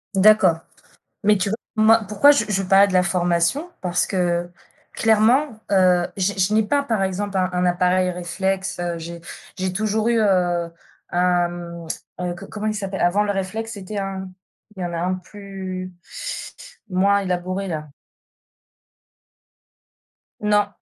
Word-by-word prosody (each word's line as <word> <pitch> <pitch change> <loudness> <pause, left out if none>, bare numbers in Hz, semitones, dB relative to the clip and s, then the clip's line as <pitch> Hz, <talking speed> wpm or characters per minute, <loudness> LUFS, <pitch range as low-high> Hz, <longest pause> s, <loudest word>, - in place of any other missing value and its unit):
D'accord, 195 -4 +5 0.7
mais 210 -1 +4
tu 190 +1 0
vois, 220 - -1 0.2
moi, 220 +1 +5
pourquoi 215 +8 +5
je 285 -7 +4
je 195 -1 0
parlais 195 +2 +5
de 190 - -4
la 185 - +4
formation? 180 - 0
Parce 180 -1 0
que 175 -2 0 0.4
clairement, 225 +3 +3
heu, 180 -2 +4
je 190 +2 +1
je 190 +2 +2
n'ai 220 +1 +4
pas, 280 +7 +1
par 225 -7 -1
exemple, 195 +1 -2
un 185 0 +1
un 180 0 0
appareil 180 +1 +2
réflexe, 190 +2 -2
heu, 175 -1 -2
j'ai 170 +1 -8 0.3
j'ai 185 0 -2
toujours 215 +3 0
eu, 235 -1 +2
heu, 175 -4 +1 0.4
un, 175 0 +2
mmh, 170 -1 -8 0.3
heu, 175 -1 -2
co 195 +3 -10
comment 215 0 -5
il 215 - 0
s'appelle? 195 -2 -4
Avant 195 +4 +3
le 205 - -1
réflexe, 220 +4 -3
c'était 200 +1 -6
un 190 -1 -4 0.5
il 185 - -5
y - - -1
en 175 - -4
a 165 - -3
un 180 +2 0
plus 185 -1 -7 1.0
moins 200 +2 +3
élaboré 185 +1 -2
là. 155 -2 -4 2.5
Non, 210 -1 +3
190 Hz, 155 wpm, -22 LUFS, 180-210 Hz, 2.5 s, D'accord